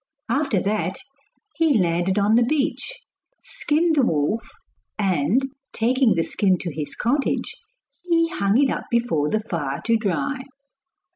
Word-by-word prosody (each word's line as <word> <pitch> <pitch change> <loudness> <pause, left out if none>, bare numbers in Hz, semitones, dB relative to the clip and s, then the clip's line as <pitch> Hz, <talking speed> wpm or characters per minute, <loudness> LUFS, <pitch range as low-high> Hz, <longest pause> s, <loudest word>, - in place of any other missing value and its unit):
After 275 -8 +1
that 195 -3 -1 0.6
he 320 -6 +3
landed 175 +1 +1
on 205 +1 +3
the 235 - +5
beach, 305 - -1 0.4
skinned 320 +2 +1
the 285 - +4
wolf, 165 - 0 0.5
and 195 - +1 0.3
taking 245 +1 +2
the 165 - +1
skin 190 0 +1
to 170 -4 -4
his 150 -1 -5
cottage, 275 +5 0 0.5
he 335 -2 +2
hung 200 - +1
it 275 -1 +3
up - - -3
before 225 -12 +1
the 215 - +1
fire 150 -10 -3
to 230 -1 +3
dry. 225 - -2
220 Hz, 140 wpm, -23 LUFS, 180-275 Hz, 0.6 s, the